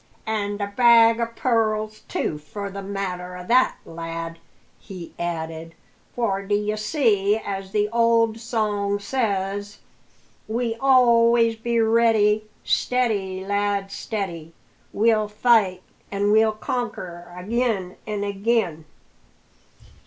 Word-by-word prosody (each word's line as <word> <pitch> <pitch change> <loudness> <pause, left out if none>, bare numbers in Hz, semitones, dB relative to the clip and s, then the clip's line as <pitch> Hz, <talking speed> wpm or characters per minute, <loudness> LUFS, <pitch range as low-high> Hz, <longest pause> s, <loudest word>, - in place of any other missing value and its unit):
"An' 205 -2 -2
the 200 0 -4
bag 230 -2 +6
o' 235 - 0
pearls, 215 -2 0
too, 150 - -2
for 200 +7 -7
the 200 +1 -6
matter 185 -2 -4
o' 180 - -9
that, 250 +6 +3
lad," 165 0 -6 0.4
he 185 -5 -10
added; 165 -1 -4 0.4
"for, 200 -5 0
d'ye 205 +1 0
see, 215 -3 +1
as 195 -3 -5
the 210 0 +1
old 230 -1 +3
song 210 -3 -1
says: 205 -3 -2 0.7
We 230 +1 -1
always 235 -3 +4
be 235 +1 -1
ready, 220 -2 +3 0.2
Steady, 200 -7 0
lad, 200 -1 -1
steady! 170 -8 -5 0.4
We'll 215 0 +2
fight 210 -4 +2 0.3
an' 200 +1 0
we'll 220 0 +4
conquer 185 -7 -5
agin 200 -2 -1
and 205 -1 -2
agin! 200 -5 -1
210 Hz, 110 wpm, -23 LUFS, 195-230 Hz, 0.7 s, bag